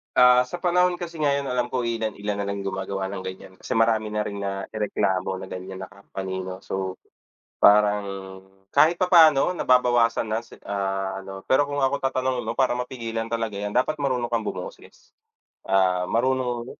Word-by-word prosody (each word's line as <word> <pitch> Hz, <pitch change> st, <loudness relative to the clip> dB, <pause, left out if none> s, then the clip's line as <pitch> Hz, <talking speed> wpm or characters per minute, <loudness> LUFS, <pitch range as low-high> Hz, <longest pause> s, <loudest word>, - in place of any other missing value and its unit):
Ah, 125 Hz, 0 st, +6 dB
sa 175 Hz, +8 st, -7 dB
panahon 180 Hz, 0 st, +3 dB
kasi 175 Hz, -2 st, -7 dB
ngayon 140 Hz, -2 st, 0 dB
alam 125 Hz, -1 st, -1 dB
ko 130 Hz, -, +1 dB
ilan-ilan 110 Hz, -3 st, -2 dB
nalang 100 Hz, 0 st, -3 dB
gumagawa 95 Hz, 0 st, -3 dB
ng 95 Hz, -1 st, -6 dB
gan'yan, 95 Hz, 0 st, -8 dB
kasi -, -, -4 dB
marami 110 Hz, -1 st, +2 dB
na 105 Hz, -, 0 dB
rin 100 Hz, -1 st, -4 dB
naireklamo 95 Hz, -1 st, -2 dB
ng -, -, -8 dB
gan'yan 95 Hz, +1 st, -7 dB
na 95 Hz, -, -7 dB
company, 95 Hz, -1 st, -6 dB
'no? 95 Hz, 0 st, -7 dB
So, 95 Hz, -1 st, -4 dB, 0.6 s
parang 105 Hz, 0 st, +5 dB, 0.6 s
kahit 160 Hz, +3 st, +5 dB
papaano 170 Hz, -4 st, +5 dB
nababawasan 120 Hz, -7 st, +2 dB
na 110 Hz, -, +1 dB
si 115 Hz, -, -14 dB
ah, 95 Hz, -1 st, -2 dB
ano 95 Hz, 0 st, -9 dB
pero 145 Hz, +2 st, +2 dB
kung 145 Hz, -1 st, -2 dB
ako 135 Hz, +1 st, +1 dB
tatanungin 130 Hz, -1 st, -1 dB
mo -, -, -2 dB
parang 125 Hz, -2 st, +1 dB
mapigilan 115 Hz, -3 st, -4 dB
talaga 115 Hz, -3 st, -3 dB
'yan 105 Hz, 0 st, -4 dB
dapat 130 Hz, +5 st, +1 dB
marunong 125 Hz, -4 st, -1 dB
kang 115 Hz, -2 st, -1 dB
bumoses, -, -, -8 dB, 0.6 s
ah, 95 Hz, -1 st, +3 dB
marunong 125 Hz, -1 st, 0 dB
115 Hz, 165 wpm, -24 LUFS, 100-130 Hz, 0.6 s, Ah